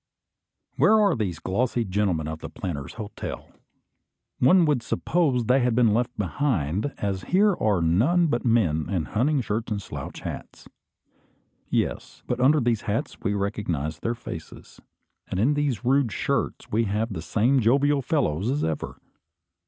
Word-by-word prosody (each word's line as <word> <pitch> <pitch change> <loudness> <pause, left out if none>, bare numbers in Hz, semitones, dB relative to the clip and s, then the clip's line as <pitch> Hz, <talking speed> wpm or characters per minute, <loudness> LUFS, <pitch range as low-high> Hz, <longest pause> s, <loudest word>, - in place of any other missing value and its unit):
Where 220 0 +5
are 200 -5 +3
the 105 -6 -1
glossy 120 +4 0
gentlemen 95 -5 0
of 80 0 -5
the - - -7
Planters' 85 - -6
Hotel? 110 -2 -7 0.9
One 175 +7 +5
would 145 -5 +1
suppose 135 -1 0
they 125 +4 +4
had 125 -2 +1
been 115 -3 +4
left 120 +2 -1
behind, 105 - -1
as 95 -2 -3
here 200 +2 +3
are 100 -6 +2
none 125 - +3
but 120 -7 0
men 95 - +1
in 90 -6 -1
hunting 135 - +1
shirts 110 0 -3
and 105 - -1
slouch - - -7
hats. - - -8 1.0
Yes; - - -2
but 125 - -2
under 140 +5 +5
these 120 -4 +1
hats 110 0 -2
we 105 -3 -1
recognise 90 -7 -2
their 115 +5 -2
faces, 85 -8 -10 0.5
and 90 - -3
in 130 +8 +3
these 145 -5 -1
rude 135 -2 +3
shirts - - -2
we 115 +2 +2
have 105 +2 -1
the 80 - -5
same 120 +10 +2
jovial 140 +5 +3
fellows 120 - 0
as 145 +3 0
ever. 80 -2 -3
115 Hz, 155 wpm, -25 LUFS, 95-135 Hz, 1.0 s, Where